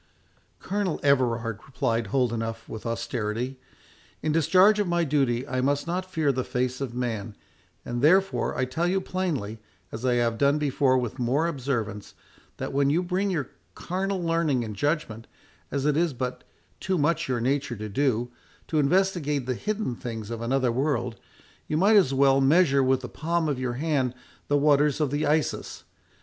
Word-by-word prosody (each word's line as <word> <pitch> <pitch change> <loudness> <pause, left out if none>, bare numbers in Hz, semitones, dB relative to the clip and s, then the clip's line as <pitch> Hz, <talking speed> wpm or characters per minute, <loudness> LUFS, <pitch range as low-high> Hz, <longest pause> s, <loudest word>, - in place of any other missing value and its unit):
"Colonel 195 -3 -2
Everard," 120 -5 +1
replied 115 -5 -1
Holdenough, 115 -2 -1
with 110 +1 -7
austerity, 115 +2 -3 0.6
"in 155 - +1
discharge 185 +7 +5
of 205 - +1
my 175 0 +1
duty 135 -4 +1
I 130 -2 -1
must 140 +2 +1
not 180 +2 -3
fear 155 -5 +2
the 130 -1 -2
face 125 +1 -2
of 125 -3 -4
man; 115 -4 -3 0.5
and, 120 0 -3
therefore, 190 +3 +3
I 130 - +1
tell 160 +7 -1
you 190 +2 +2
plainly, 155 - -3 0.3
as 110 - -7
I 125 -1 +2
have 115 -1 0
done 140 +1 +3
before 140 -3 +2
with 125 -2 -3
more 130 +6 +1
observance, 120 -9 -3 0.4
that - - -4
when 140 0 +2
you 165 +5 +2
bring 185 +3 0
your 155 -8 -2 0.2
carnal 190 +1 -2
learning 165 -6 +1
and 110 -2 -6
judgment, 115 - -2 0.4
as 140 -1 -2
it 150 -1 +2
is 165 -1 +1
but 125 0 -4 0.3
too 190 -1 -1
much 160 +2 +1
your 125 -2 0
nature 135 +1 0
to 110 0 -6
do, 120 +1 0 0.4
to 155 - +1
investigate 150 -3 +1
the 130 - -1
hidden 210 - -2
things 115 -2 -6
of 115 -1 -4
another 125 +1 +1
world, 125 -2 -1 0.5
you 150 - 0
might 200 +6 +5
as 190 -10 +5
well 135 0 +4
measure 140 0 +4
with 130 0 +2
the 125 - -6
palm 165 +2 -1
of 140 -4 -1
your 125 -2 -2
hand 135 -2 0 0.3
the 145 - +3
waters 145 0 +3
of 150 -4 0
the 145 +1 0
Isis. 150 0 -1
135 Hz, 175 wpm, -26 LUFS, 120-160 Hz, 0.6 s, discharge